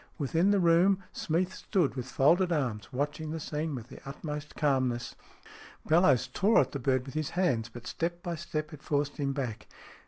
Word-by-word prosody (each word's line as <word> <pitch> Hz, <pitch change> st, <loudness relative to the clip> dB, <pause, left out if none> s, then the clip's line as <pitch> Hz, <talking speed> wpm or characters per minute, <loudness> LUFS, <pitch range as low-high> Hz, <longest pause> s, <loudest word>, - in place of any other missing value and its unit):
Within 165 Hz, +5 st, +2 dB
the 205 Hz, -1 st, +4 dB
room 180 Hz, +3 st, +4 dB
SMEATH 175 Hz, +3 st, 0 dB
41 -, -, -17 dB
Smeath -, -, -11 dB
stood 180 Hz, -11 st, 0 dB
with 125 Hz, -1 st, -4 dB
folded 170 Hz, +8 st, +3 dB
arms, 125 Hz, -10 st, -1 dB
watching 145 Hz, +4 st, -2 dB
the 160 Hz, +1 st, -3 dB
scene 150 Hz, 0 st, -3 dB
with 120 Hz, -1 st, -8 dB
the 135 Hz, -, -10 dB
utmost 150 Hz, +1 st, -6 dB
calmness. 130 Hz, -5 st, 0 dB, 0.7 s
Bellowes 160 Hz, -6 st, +4 dB
tore 195 Hz, -, +3 dB
at 130 Hz, -, -2 dB
the 140 Hz, -, -4 dB
bird 130 Hz, 0 st, +1 dB
with 135 Hz, -, -9 dB
his 155 Hz, -1 st, -2 dB
hands, 125 Hz, -12 st, +1 dB
but 120 Hz, +1 st, -11 dB
step 170 Hz, +1 st, -3 dB
by 175 Hz, -2 st, -2 dB
step 155 Hz, -1 st, -4 dB
it 150 Hz, -, -10 dB
forced 145 Hz, -1 st, -1 dB
him 140 Hz, -2 st, 0 dB
back. 120 Hz, -6 st, -4 dB
150 Hz, 195 wpm, -30 LUFS, 130-170 Hz, 0.7 s, the